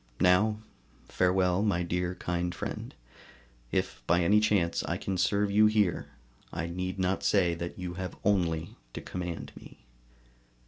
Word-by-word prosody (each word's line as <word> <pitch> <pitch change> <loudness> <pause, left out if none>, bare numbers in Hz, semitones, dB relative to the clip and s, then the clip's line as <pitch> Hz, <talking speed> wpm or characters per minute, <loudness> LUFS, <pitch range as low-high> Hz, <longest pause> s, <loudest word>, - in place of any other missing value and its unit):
Now, 95 +4 +4 0.5
farewell, 90 0 +2
my 100 -5 +1
dear 90 +1 -1
kind 90 0 -2
friend! - - -5 0.8
If - - -1
by 85 +1 +3
any 105 +5 +5
chance 100 -5 +2
I - - -1
can 95 - -3
serve 100 +2 +1
you 105 +1 +6
here, 105 -5 +1 0.4
I 80 - -3
need 90 +2 -4
not 95 0 0
say 90 -4 +3
that 85 +1 -5
you 90 -1 -5
have 90 -2 -5
only 85 -5 +1 0.2
to - - -4
command 90 -3 -5
me. - - -14
90 Hz, 145 wpm, -29 LUFS, 85-100 Hz, 0.8 s, you